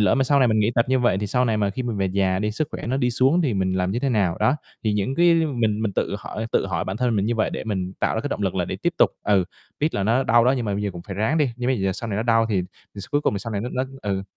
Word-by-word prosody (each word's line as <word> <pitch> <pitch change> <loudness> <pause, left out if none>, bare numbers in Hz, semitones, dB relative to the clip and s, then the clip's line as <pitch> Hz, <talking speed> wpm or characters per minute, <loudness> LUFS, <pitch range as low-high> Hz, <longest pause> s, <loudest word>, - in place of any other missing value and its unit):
lỡ 100 -3 +4
mà 135 -1 +2
sau 140 +1 +3
này 130 - +4
mình 110 -1 +2
nghỉ 105 +2 +2
tập 115 - +3
như 130 - +3
vậy 120 -6 +2
thì 105 - -2
sau 125 +5 +1
này 115 -3 +1
mà 100 -2 +1
khi 130 +6 -4
mình 120 -4 -3
về 95 -1 0
già 95 0 +1
đi, 105 +1 -1
sức 145 +8 -2
khỏe - - -6
nó 130 +3 0
đi 125 -2 +1
xuống 135 +9 +3
thì 130 -8 0
mình 95 -1 0
làm 90 0 0
như 110 - -1
thế 135 - 0
nào?" 100 -8 +1
Đó, 135 - +3 0.3
thì 110 - +2
những 105 +6 -1
cái 170 +1 +5
mình 120 -10 0
mình 105 -3 -1
tự 100 - -1
hỏi 110 +2 -5
tự - - +2
hỏi 85 -3 -2
bản 95 +2 -4
thân 120 -2 0
mình 100 0 +1
như 120 - 0
vậy 110 - 0
để - - -5
mình 95 -4 -3
tạo - - +1
ra - - -1
cái - - -3
động - - -3
lực - - 0
là - - 0
để - - -4
tiếp - - -23
tiếp - - +1
tục. - - +5
Ừ, 100 -3 +3 0.4
biết 155 +2 0
là 100 - 0
nó 115 +6 +2
đau 120 0 +4
đó, 125 - +4
nhưng 120 - -2
mà 100 -2 -1
bây 105 - -2
giờ 100 - -1
cũng 85 -1 -8
phải 95 - -7
ráng 110 +11 +1
đi. 145 -4 +2
Nhưng 125 0 -2
bây 130 -5 +1
giờ 95 0 +1
sau 115 - -6
này 100 - -2
nó 110 - 0
đau 115 -1 +3
thì 100 -4 +1 0.3
d - - -11
cuối 145 - +2
cùng 105 - 0
thì 100 - -1
sau 115 +2 -6
này 100 - -1
nó 120 - -3
nó 130 - 0 0.2
ừ, 100 -2 -1
110 Hz, 365 wpm, -23 LUFS, 100-125 Hz, 0.4 s, cái